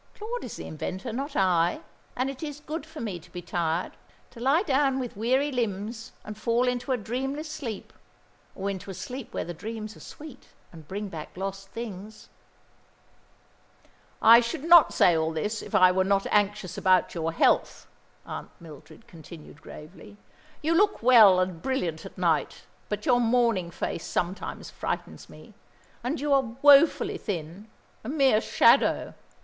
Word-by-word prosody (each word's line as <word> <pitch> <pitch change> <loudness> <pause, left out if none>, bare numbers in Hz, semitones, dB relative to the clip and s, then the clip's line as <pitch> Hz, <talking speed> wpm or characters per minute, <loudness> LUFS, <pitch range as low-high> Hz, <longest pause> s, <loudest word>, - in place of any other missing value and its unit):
"Claude 470 +3 -5
is - - -7
the - - -8
inventor, 185 +8 -5
not 275 +4 -4
I. 175 -3 +2 0.3
And 255 +2 -1
it 270 -1 -7
is 295 -2 -6
good 310 +2 -6
for 320 -1 -10
me 200 -6 -4
to - - -18
be 175 -1 -8
tired; 170 0 -2 0.4
to 235 - -13
lie 275 +9 +2
down 275 -5 +1
with 250 -2 -5
weary 260 +7 +1
limbs 225 -1 -3
and 210 - -7
fall 235 +3 0
into 250 +1 -2
a 255 - +2
dreamless 270 +7 -4
sleep 240 -10 -7 0.6
or 195 - -4
into 195 0 -7
a 190 - -6
sleep 250 +3 -7
where - - -3
the 175 - -6
dreams 215 +4 -7
are - - -15
sweet, 295 -4 -12 0.3
and 160 -3 -13
bring 205 +4 -5
back 160 -1 -9
lost 195 0 -5
things." 215 -1 -8 1.9
"I 230 +1 +9
should 245 +5 -3
not 335 -2 +7
say 175 - +4
all 160 0 0
this, 210 +8 -3
if - - -6
I 185 0 +6
were 185 +1 +2
not 195 0 +1
anxious 205 -3 0
about 185 -1 +3
your 165 -1 -2
health," 165 - +1 0.4
Aunt - - -7
Mildred 165 +7 -14
continued 160 -2 -13
gravely. 185 +6 -12 0.5
"You 320 +2 +2
look 405 - +2
well 220 -7 +7
and 185 -3 -2
brilliant 180 -12 -2
at - - -16
night, 170 -4 0 0.3
but 210 0 -4
your 245 -1 +4
morning 230 -6 +2
face 170 -1 -4
sometimes 180 +2 -4
frightens - - -5
me; - - -15 0.5
and 260 +5 -2
you 290 +1 0
are 260 -4 +1
woefully 290 +2 +5
thin, 180 +1 -6 0.4
a 220 - -6
mere 270 -7 +3
shadow. - - +3
215 Hz, 165 wpm, -26 LUFS, 185-265 Hz, 1.9 s, I